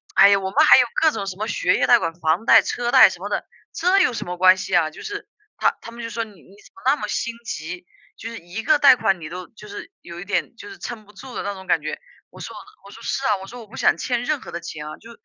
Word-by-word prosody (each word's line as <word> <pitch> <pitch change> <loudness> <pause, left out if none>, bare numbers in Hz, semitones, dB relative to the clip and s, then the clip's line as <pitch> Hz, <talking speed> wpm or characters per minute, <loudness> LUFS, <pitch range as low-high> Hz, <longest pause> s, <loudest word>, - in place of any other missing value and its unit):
唉 200 - +8
呀， 200 - +5
我 190 0 -4
们 305 +4 +4
还 - - +8
有 250 - +5 0.2
各 320 - +6
种 200 -3 -4
什 190 -1 -6
么 215 +2 -3
学 180 -3 +1
业 - - +1
贷 - - +7
款、 165 0 -3
房 170 +5 0
贷、 225 -2 +7
车 240 +4 -2
贷 - - +8
什 - - -9
么 - - -6
的， - - -2 0.3
这 365 +3 +2
有 355 - +3
什 230 - -5
么 180 0 -5
关 185 +1 +6
系 185 -1 -2
啊？” 155 -2 +3
就 - - -12
是 410 -1 -6 0.3
他 - - +2
他 230 - -10
们 235 0 -9
就 230 - -5
说： 230 0 -2
“你 215 -2 -13
怎 195 +4 -19
么 230 - -16
那 270 +2 +4
么 - - -5
心 235 -1 -3
急， 175 +2 -6 0.3
就 225 - -8
是 230 - -8
1 175 +5 -7
个 305 +5 +3
贷 280 -3 +7
款 195 -6 0
你 155 - -7
都 180 +2 -8
就 210 -2 -14
是 290 - -9
有 170 0 -10
一 - - -6
点 205 - -2
就 410 - -11
是 395 - -11
撑 230 - -7
不 210 +1 -20
住 250 +5 -11
的 - - -3
那 200 0 -4
种 190 0 -11
感 - - +1
觉。” - - -5 0.3
我 - - -15
说 - - -8 0.3
我 200 - -12
说：” 230 - -13
是 270 - -2
啊， 210 - +2
我 190 0 -10
说 245 +3 -10
我 220 - -13
不 245 - -14
想 - - +3
欠 245 -1 -2
任 300 +1 -1
何 170 - -10
的 170 - -5
钱 155 -3 -8
啊， 155 - -8
就 230 +1 -14
210 Hz, 325 characters per minute, -22 LUFS, 180-245 Hz, 0.3 s, 唉